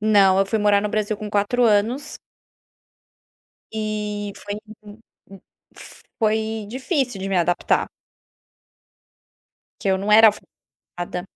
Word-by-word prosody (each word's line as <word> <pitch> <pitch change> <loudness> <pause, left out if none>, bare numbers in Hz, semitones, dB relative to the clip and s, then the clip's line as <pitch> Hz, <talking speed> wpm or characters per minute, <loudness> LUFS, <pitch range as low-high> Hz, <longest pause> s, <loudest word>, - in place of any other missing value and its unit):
Não, 200 -3 +4
eu 195 - +3
fui 220 +3 -1
morar 205 -1 +3
no 210 - -2
Brasil 215 0 -1
com 210 0 -7
4 210 +5 +1
anos 225 +6 +1 1.6
e 210 -1 -3
foi 205 - -6 0.3
m 210 +1 -13 0.3
m 195 -1 -13 0.8
foi 220 -1 -1
difícil 260 - -2
de 195 - -4
me 195 - 0
adaptar. 175 0 +1 1.9
Que 200 - -2
eu 190 - +3
não 200 +2 -1
era 225 +1 +9
alfa 210 - -3 0.5
ada 175 0 -4
210 Hz, 125 wpm, -22 LUFS, 200-220 Hz, 1.9 s, era